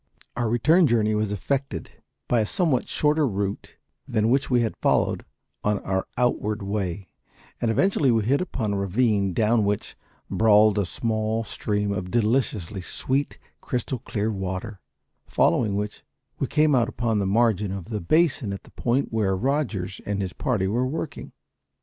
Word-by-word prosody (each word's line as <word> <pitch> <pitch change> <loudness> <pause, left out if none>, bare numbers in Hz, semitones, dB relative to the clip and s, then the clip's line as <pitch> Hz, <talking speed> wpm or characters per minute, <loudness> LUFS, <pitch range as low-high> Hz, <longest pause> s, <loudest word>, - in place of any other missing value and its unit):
Our 120 -2 0
return 155 +9 +4
journey 110 -3 +2
was 105 -1 0
effected 130 - -3 0.4
by 120 - +2
a - - +1
somewhat 155 - +1
shorter 150 0 +2
route 100 -2 -3 0.3
than 110 - 0
that 110 - +3
which 135 +3 +2
we 125 -2 +3
had 115 - -1
followed - - +1 0.4
on 105 0 +2
our 95 0 -1
outward 110 -4 0
way, 100 -3 -3 0.5
and 115 - +1
eventually 150 - +2
we 115 -2 +3
hit 135 - +2
upon 115 - -2
a - - -1
ravine 100 0 +1
down 110 +4 +2
which 100 0 -2 0.3
brawled 105 -1 +4
a 100 - 0
small 110 +4 -1
stream 105 -1 -2
of 95 -2 -3
deliciously 110 -4 0
sweet 135 +9 -1 0.2
crystal 125 0 -3
clear 110 -3 -2
water, 95 +1 -5 0.5
following 105 -4 +2
which 105 +1 -4 0.4
we - - 0
came 150 0 +3
out 120 -1 +3
upon 115 -4 -1
the 100 - 0
margin 105 -2 +2
of 95 -3 -5
the 105 -1 -4
basin 135 - +2
at 100 - -7
the - - -18
point 125 +1 -1
where 100 -4 +1
Rogers 115 -7 -1
and 100 -1 -2
his 95 -2 -3
party 120 -9 0
were 120 +6 0
working. 155 +3 -5
110 Hz, 165 wpm, -25 LUFS, 100-125 Hz, 0.5 s, return